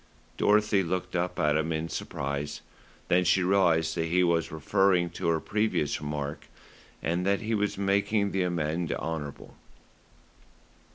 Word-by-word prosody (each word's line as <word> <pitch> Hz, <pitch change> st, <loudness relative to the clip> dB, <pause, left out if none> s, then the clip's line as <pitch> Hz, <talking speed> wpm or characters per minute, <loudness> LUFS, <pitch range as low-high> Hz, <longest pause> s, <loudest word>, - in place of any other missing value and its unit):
Dorothy 105 Hz, -1 st, +3 dB
looked 90 Hz, +1 st, -3 dB
up 90 Hz, +1 st, -1 dB
at 75 Hz, 0 st, +2 dB
him 80 Hz, +1 st, 0 dB
in 80 Hz, 0 st, -2 dB
surprise, 70 Hz, -2 st, -4 dB, 0.5 s
then 90 Hz, +1 st, +3 dB
she 90 Hz, +1 st, +3 dB
realised 90 Hz, -4 st, +3 dB
that 80 Hz, -, 0 dB
he 90 Hz, +2 st, +2 dB
was 85 Hz, -3 st, +1 dB
referring 90 Hz, +2 st, +2 dB
to 85 Hz, -, -4 dB
her 80 Hz, -1 st, +2 dB
previous 105 Hz, -8 st, -1 dB
remark, 75 Hz, 0 st, -4 dB, 0.6 s
and 85 Hz, +2 st, 0 dB
that 100 Hz, +2 st, +1 dB
he 110 Hz, +1 st, -2 dB
was 105 Hz, -2 st, 0 dB
making 100 Hz, +1 st, +1 dB
the 95 Hz, -, 0 dB
amende 85 Hz, -1 st, -1 dB
honorable. 75 Hz, -3 st, -5 dB
90 Hz, 145 wpm, -28 LUFS, 80-100 Hz, 0.6 s, Dorothy